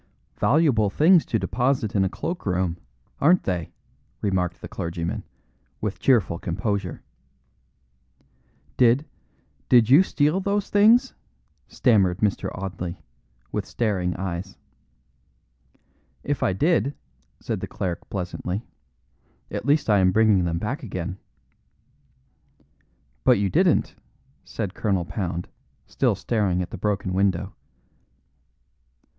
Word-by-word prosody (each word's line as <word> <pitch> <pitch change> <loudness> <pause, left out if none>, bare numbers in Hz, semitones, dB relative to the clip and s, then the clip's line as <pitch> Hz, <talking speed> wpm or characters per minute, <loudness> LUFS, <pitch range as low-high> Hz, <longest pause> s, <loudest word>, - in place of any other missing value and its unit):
"Valuable 130 -8 +3
things 160 - +4
to 110 - +1
deposit 120 0 0
in 95 - +3
a 95 - +1
cloak 175 - -5
room, 90 -2 0 0.4
aren't 175 +5 +4
they?" 90 -4 -3 0.5
remarked 95 -4 -1
the - - -8
clergyman, 85 0 -4 0.6
with 105 -2 -3
cheerful 110 -10 +2
composure. 95 0 -3 1.7
"Did 125 +4 +4 0.6
did 120 -2 +5
you 145 +6 +9
steal 155 -1 +1
those 200 +1 -1
things?" 230 +6 +5 0.5
stammered 95 -7 +2
Mr. 105 -1 0
Audley, 90 -1 -5 0.5
with - - -2
staring 95 -6 -1
eyes. 95 0 -5 1.7
"If 145 0 -2
I - - +2
did," 145 - +1 0.4
said - - -3
the - - -5
cleric 90 -3 -4
pleasantly, 90 +2 -4 0.9
"at - - -4
least 150 +2 +3
I 105 -2 +4
am 95 -1 +4
bringing 105 -3 +4
them 85 -1 -1
back 120 - -3
again." 95 - -5 2.0
"But - - +5
you 100 -2 0
didn't," - - +2 0.5
said 100 -5 -5
Colonel 95 -6 0
Pound, 90 -3 -4 0.4
still - - +1
staring 100 -6 0
at 85 - -9
the - - -6
broken 100 -2 -1
window. 95 0 0
100 Hz, 115 wpm, -24 LUFS, 90-130 Hz, 2.0 s, you